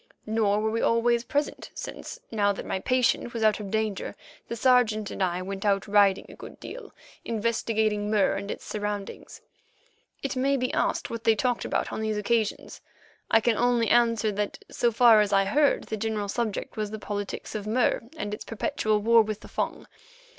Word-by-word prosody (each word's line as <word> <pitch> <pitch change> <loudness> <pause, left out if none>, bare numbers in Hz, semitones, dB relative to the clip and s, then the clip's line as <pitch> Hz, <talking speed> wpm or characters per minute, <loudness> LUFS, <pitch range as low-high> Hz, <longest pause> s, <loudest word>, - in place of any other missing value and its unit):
Nor 215 -1 +1
were 220 0 0
we 230 - -1
always 235 0 +2
present, 290 +4 -2
since, - - -7
now 205 -2 +2
that - - -7
my 190 - -2
patient 250 0 +1
was 225 - -1
out 215 -1 +3
of 205 -2 -6
danger 215 -1 -2 0.3
the 235 - -4
Sergeant 225 -4 +3
and - - -6
I 180 -1 0
went 195 +1 -5
out 200 -1 +1
riding 200 -2 +4
a - - -12
good - - -11
deal—investigating 220 - -3
Mur 210 -3 +3
and 200 +1 -5
its - - -6
surroundings. 205 -1 -5 0.8
It 275 - -2
may 275 +2 +2
be 255 0 -2
asked - - 0
what 230 -1 -5
they 225 - +4
talked 245 +2 0
about - - -1
on - - -3
these 215 -1 -1
occasions. 215 0 -1 0.5
I 225 - +5
can 225 -1 +2
only 240 -2 +2
answer 230 -2 +3
that, 205 0 -3
so 240 - +1
far 230 -1 +6
as 205 - 0
I 195 0 +4
heard, 285 +8 +2
the 220 - -4
general 215 -1 -2
subject 220 -1 -3
was 215 -1 -2
the 220 - -5
politics 205 -1 -5
of 210 -1 -4
Mur 230 +2 +2 0.2
and 205 -7 -4
its 210 - -5
perpetual 215 -1 -1
war 230 +1 +6
with 215 -1 -3
the - - -11
Fung. - - -3
220 Hz, 190 wpm, -27 LUFS, 205-235 Hz, 0.8 s, far